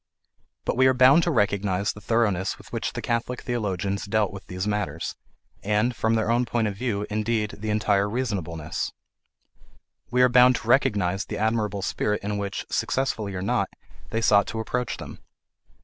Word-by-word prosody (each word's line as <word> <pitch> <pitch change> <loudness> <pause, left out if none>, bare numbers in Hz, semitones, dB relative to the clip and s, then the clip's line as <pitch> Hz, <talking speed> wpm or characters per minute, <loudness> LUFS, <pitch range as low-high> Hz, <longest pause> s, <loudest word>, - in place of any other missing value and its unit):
But - - -1
we 130 0 +6
are 130 - +4
bound 130 +6 +7
to - - +1
recognize 100 -2 +1
the 105 - -12
thoroughness 105 -4 +1
with - - -16
which - - -2
the - - -5
Catholic 120 +1 -2
theologians 100 -5 -2
dealt 105 -1 +1
with 95 - -10
these 90 +1 -4
matters, 105 -7 -2 0.5
and, 105 +4 +1
from 110 0 +1
their 110 0 +1
own 120 +1 +3
point 120 -2 0
of 100 - -3
view, 105 -2 -2
indeed, 110 0 0
the 110 +1 -4
entire 105 -1 +2
reasonableness; 95 -10 -3 1.2
we 125 +1 +3
are - - +7
bound 125 0 +6
to 115 - -6
recognize 100 -8 +2
the - - -5
admirable 105 -2 0
spirit 105 +1 -1
in 105 0 -2
which, 100 -1 -4
successfully 110 -7 -1
or 90 - -3
not, 100 - 0 0.4
they 115 - -1
sought 105 -3 +4
to 110 - -4
approach 125 +2 -2
them. - - -9
105 Hz, 175 wpm, -25 LUFS, 100-120 Hz, 1.2 s, bound